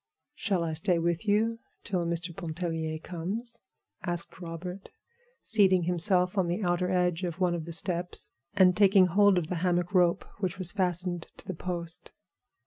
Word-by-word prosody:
"Shall 200 - 0
I 160 -1 -2
stay 170 +3 +1
with 170 +4 -1
you 225 +3 +2 0.2
till 175 -3 -1
Mr. 170 0 -3
Pontellier 165 -2 -3
comes?" 190 +9 -4 0.4
asked 175 -1 -4
Robert, 180 +3 -7 0.5
seating 190 -5 +4
himself 180 +2 +2
on 180 - +2
the 175 +5 -1
outer 175 0 +1
edge 180 -2 +1
of 175 0 -3
one 180 -2 +2
of 165 -2 -3
the 170 - -6
steps 175 +1 -1 0.2
and 185 -2 +6
taking 195 -1 +6
hold 200 +2 +4
of 175 - +1
the 175 +2 -3
hammock 175 0 +1
rope 175 -2 +3
which 190 -1 -2
was 185 -2 0
fastened 180 -3 -1
to - - -13
the 190 - -4
post. 170 -1 -4
180 Hz, 165 wpm, -29 LUFS, 170-190 Hz, 0.5 s, and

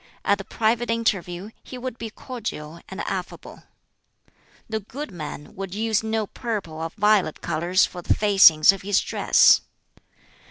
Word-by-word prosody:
At 200 0 +2
the - - -5
private 225 +3 0
interview 200 -4 -1
he 255 - -10
would 250 -1 -6
be 230 - -5
cordial 205 - -7
and 190 +1 -6
affable. 185 -2 -6 1.0
The 220 -1 -2
good 260 +6 -8
man 150 -4 -8
would 195 0 -6
use 220 0 0
no 220 -1 -1
purple 200 -8 -5
or 165 - -3
violet 210 -6 +2
colors 175 +3 +1
for 180 - -8
the - - +1
facings 190 -6 +6
of 195 - -7
his 200 0 +2
dress. - - +4
200 Hz, 150 wpm, -23 LUFS, 175-220 Hz, 1.0 s, facings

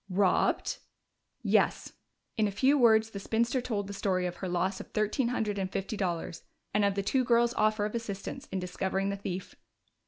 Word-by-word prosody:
"Robbed?" 190 0 +2 0.6
"Yes." - - +2 0.4
In 215 -2 +2
a - - -2
few 260 +8 +3
words 225 -4 +5
the 200 - -5
spinster 235 +5 0
told 215 -5 -2
the 200 - -7
story 190 -2 0
of 175 - -4
her 190 - -4
loss 185 +2 0
of - - -8
thirteen 215 +4 0
hundred 215 -4 -1
and 190 -1 -2
fifty 195 +3 -3
dollars, 175 -4 -3 0.3
and 205 0 +3
of 200 -1 +2
the 200 - -1
two 260 +5 +2
girls' 235 -1 +3
offer 215 -1 +2
of 210 - -4
assistance 230 +4 -5
in - - -2
discovering 190 +2 -1
the 200 - -1
thief. 190 -2 -5
205 Hz, 190 wpm, -30 LUFS, 190-230 Hz, 0.6 s, words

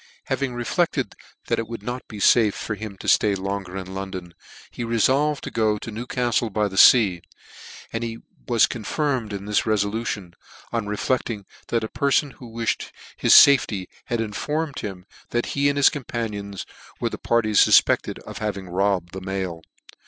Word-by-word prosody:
Having 135 -3 -2
reflected 160 +8 -1 0.3
that - - 0
it 115 - -3
would 115 -2 -7
not 125 +3 -5
be 110 - -9
fafe 110 0 +4
for 110 - -4
him 105 -2 -7
to - - -9
flay 105 -2 +4
longer 95 -1 -4
in 95 0 -6
London, 95 -3 -6 0.4
he 120 - -5
refolved 130 +6 +2
to - - -5
go 110 -2 +1
to 115 - -7
Newcaftle 120 0 -1
by 105 +1 +1
fea, 95 -2 +6 0.7
and 115 +1 -2
he 115 -1 -4 0.3
was 120 -3 +5
confirmed 125 0 -2
in 100 0 -5
this 105 +1 0
resolution, 105 -3 -1 0.4
on 115 -3 -1
reflecting 105 0 -2 0.2
that 115 -1 0
a - - -2
perfon 140 +3 +1
\vho 120 -3 -11
wiflied 115 -1 -2 0.3
his - - +5
fafety 120 -9 +6 0.2
had 120 - -2
informed 145 +8 -2
him 95 -3 -6 0.2
that 120 0 0
he 140 0 +2
'and 140 - -1
his 140 - +6
COITH 145 -5 -7
panions 100 -4 -4 0.3
were - - 0
the - - -6
parties 110 -3 +2
fufpected - - +4
of - - -8
having 100 -3 -4
robbed 95 -1 0
the 95 - -6
mail. 95 -3 -4
110 Hz, 170 wpm, -23 LUFS, 100-120 Hz, 0.7 s, fea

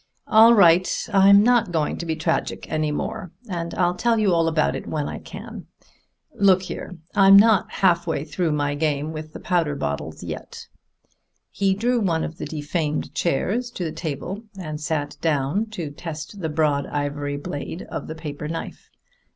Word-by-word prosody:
"All 225 +2 +7
right 180 -2 +4
I'm 200 +1 +7
not 235 -5 +3
going 160 -3 0
to 170 - -5
be 160 - -1
tragic 160 +1 -2
any 155 -1 0
more, 160 +3 -4 0.2
and 170 -3 -4
I'll 175 -1 +2
tell 230 +5 +1
you 210 -4 +3
all 165 -1 +2
about 160 -1 +1
it - - -6
when 150 -2 -2
I - - -5
can. - - -9 0.7
Look 190 -2 +4
here, 180 -1 -7 0.2
I'm 195 -1 +7
not 215 0 +5
half 175 -3 +2 0.2
through 160 +2 -1
my 145 -1 0
game 150 0 -1
with 155 0 -7
the - - -8
powder 170 -5 0
bottles 70 - -4
yet." - - -7 0.9
He 195 -1 +1
drew 240 +4 +1
one 170 -6 0
of 160 - -6
the - - -4
defamed 150 0 -3
chairs 200 - 0
to 195 - -5
the 160 - -2
table 175 +6 -5 0.2
and 155 -4 -6
sat 150 -2 -2
down 155 +7 0
to 175 -9 -6
test 160 +5 -7
the 160 - -2
broad 150 -2 +1
ivory 145 0 -3
blade 145 +4 -6
of - - -6
the 160 - -6
paper 150 -2 -6
knife. 165 +1 -6
165 Hz, 175 wpm, -23 LUFS, 150-195 Hz, 0.9 s, All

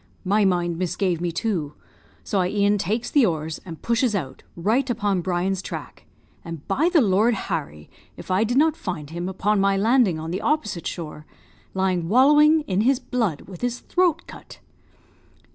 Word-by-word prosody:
"My 205 +2 +3
mind 175 -2 0
misgave 180 -1 -1
me, 175 -1 -1
too, 170 -5 -2 0.5
so 205 - -1
I 180 - +2
e'en 205 0 +2
takes 220 +6 -2
the 285 - +4
oars, 160 -5 -1
and 165 -3 -9
pushes 235 -1 +1
out, 135 -9 -4
right 230 +10 0
upon 205 -5 0
Brian's 185 +1 -1
track; - - -8 0.4
and, 165 -3 -8
by 295 - +2
the 335 -4 +5
Lord 215 +2 +3
Harry! 75 - -5 0.3
if - - -8
I 185 +4 +3
did 240 +3 0
not 315 +2 +4
find 165 - -6
him, 175 +2 -4
upon 200 +2 0
my 195 0 +2
landing 220 -4 +3
on 160 +1 -5
the 190 +4 -3
opposite 210 - -1
shore, 155 -3 -7 0.5
lying 185 -3 0
wallowing 295 +6 +5
in 195 -8 -1
his 260 +4 +3
blood 225 - -2
with 185 -3 -12
his 245 0 -2
throat 350 -3 +1
cut. - - -12
195 Hz, 175 wpm, -23 LUFS, 175-240 Hz, 0.5 s, the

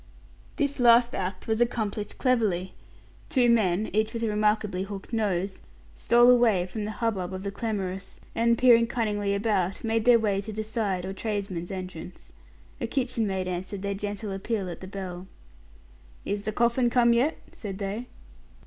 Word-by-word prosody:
This 285 -2 -1
last 240 0 +6
act 185 0 -4
was 220 +1 0
accomplished 215 -3 -1
cleverly. 215 -8 +1 0.6
Two 245 -3 +4
men, 210 -3 +2
each 215 +2 +1
with 230 - -2
a - - +1
remarkably 210 -2 +1
hooked 195 +3 -7
nose, 195 -3 -1 0.3
stole 240 - +5
away 225 -7 +4
from 205 +3 -5
the - - -3
hubbub 195 -6 -1
of 185 - -6
the 200 - -3
clamorous, 195 -3 -4
and 235 0 +2
peering 235 -2 +6
cunningly 210 -4 -1
about, 200 -3 0
made 225 0 0
their 245 -1 +7
way 205 -3 0
to 215 +2 -6
the 215 +1 -3
side 210 -5 -2
or 190 - -4
tradesman's 195 -4 -3
entrance. 185 -2 -8 0.5
A - - -2
kitchen 245 -5 0
maid 190 -1 -2
answered 185 +2 -4
their 200 0 -1
gentle 205 +1 -4
appeal 195 -1 -3
at 170 - -8
the 185 - -7
bell. 185 -2 -6 1.0
"Is 205 0 -3
the 215 - 0
coffin 235 +2 +2
come 235 -1 +4
yet?" 260 +7 +2
said 195 -3 -7
they. 205 +5 -4
210 Hz, 165 wpm, -27 LUFS, 190-230 Hz, 1.0 s, their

